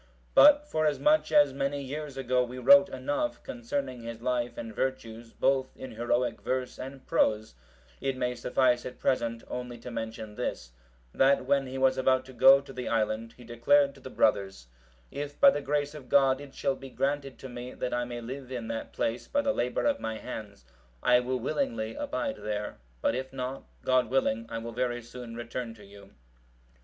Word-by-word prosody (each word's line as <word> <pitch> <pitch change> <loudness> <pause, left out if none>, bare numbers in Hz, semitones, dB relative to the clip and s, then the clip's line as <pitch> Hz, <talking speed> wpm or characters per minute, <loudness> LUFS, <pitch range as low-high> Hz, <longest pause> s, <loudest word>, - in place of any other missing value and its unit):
But 295 0 +7
forasmuch 160 - +2
as 145 -3 +5
many 140 +1 -1
years 140 +1 -6
ago 125 -1 +1
we 125 +1 -7
wrote 190 +9 +7
enough 145 - -2
concerning 245 - -4
his 115 0 -7
life 120 -1 -1
and 115 -1 -6
virtues, 115 -3 -3
both 135 -1 +1
in 130 - -8
heroic 120 +1 -1
verse 125 +3 -2
and 135 +1 -8
prose,(749) 110 - +1 0.6
it 130 - -2
may 125 -1 0
suffice 125 0 +2
at 125 - -7
present 115 -3 0
only 125 -1 -5
to 120 +1 -9
mention 110 -2 -5
this, - - -4 0.4
that 135 -1 +3
when 135 0 +2
he 130 +1 -5
was 130 0 +3
about 130 0 +2
to 130 - -12
go 135 +2 +8
to 140 -1 -12
the 125 -1 -5
island, 110 0 -1
he 125 - -13
declared 140 +5 +3
to 140 - -16
the 130 - -8
brothers, 95 - +1 0.5
"If 145 0 -6
by 280 - +8
the 145 - -2
grace 145 +1 -1
of 145 -5 -11
God 135 -1 +4
it 140 -2 -11
shall 135 - 0
be 135 - -10
granted 140 +1 -2
to 135 - -9
me, 125 0 -8
that 125 - -3
I 120 - 0
may 120 0 -6
live 130 +2 -7
in 120 -3 -4
that 115 0 -5
place 115 +1 -2
by 285 0 +1
the 275 -1 +2
labour 125 +1 -1
of 285 -1 +2
my 110 0 -3
hands, 100 - -8 0.4
I 125 0 +6
will 130 +1 -1
willingly 265 - -2
abide 290 -1 -3
there; 105 -1 -4 0.3
but - - +3
if 130 +2 -4
not, 130 0 -5 0.2
God 130 -3 +3
willing, 115 -3 +1
I 115 - -4
will 115 +1 -6
very 120 0 -1
soon 120 0 -9
return 120 0 -5
to 105 -2 -15
you." 100 0 -15
130 Hz, 190 wpm, -29 LUFS, 115-140 Hz, 0.6 s, go